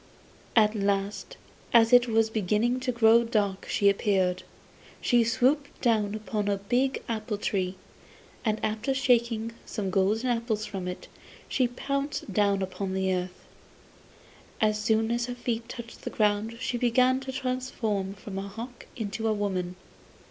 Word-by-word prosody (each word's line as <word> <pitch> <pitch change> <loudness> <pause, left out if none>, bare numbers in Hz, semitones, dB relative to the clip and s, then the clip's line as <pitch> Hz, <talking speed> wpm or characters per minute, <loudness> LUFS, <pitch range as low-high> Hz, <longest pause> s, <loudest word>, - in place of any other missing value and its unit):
At 215 -2 +5
last 200 - -1 0.4
as 230 +1 +6
it 245 0 +7
was 225 -1 +2
beginning 220 +4 +1
to 255 0 -1
grow 235 0 +5
dark 205 -4 -1
she 200 - +2
appeared. 190 -2 +2 0.6
She 240 -1 +3
swooped 260 +5 +1
down 215 -4 +1
upon 215 -1 -3
a 200 -1 +1
big 245 +7 0
apple 215 -2 -2
tree, 190 -2 -1 0.7
and 215 -1 0
after 220 +5 -1
shaking 235 -3 +2
some 200 -4 -4
golden 215 +6 +2
apples 230 -2 -1
from 195 -4 -5
it, 180 - -6 0.4
she 255 -2 +2
pounced 275 -2 -3
down 200 -1 +2
upon 190 0 -4
the 190 0 +1
earth. 180 0 -4 1.1
As 215 -1 +2
soon 220 +1 +2
as 240 0 0
her 245 - -4
feet 235 -2 -3
touched 235 -1 -8
the - - -4
ground 215 +2 0
she 245 -1 -2
became 255 +2 +3
transformed 255 -7 -3
from 195 -1 -6
a 195 - -5
hawk 230 +5 -9
into 220 0 -3
a 220 - +2
woman. 185 -3 -2
220 Hz, 150 wpm, -28 LUFS, 200-240 Hz, 1.1 s, it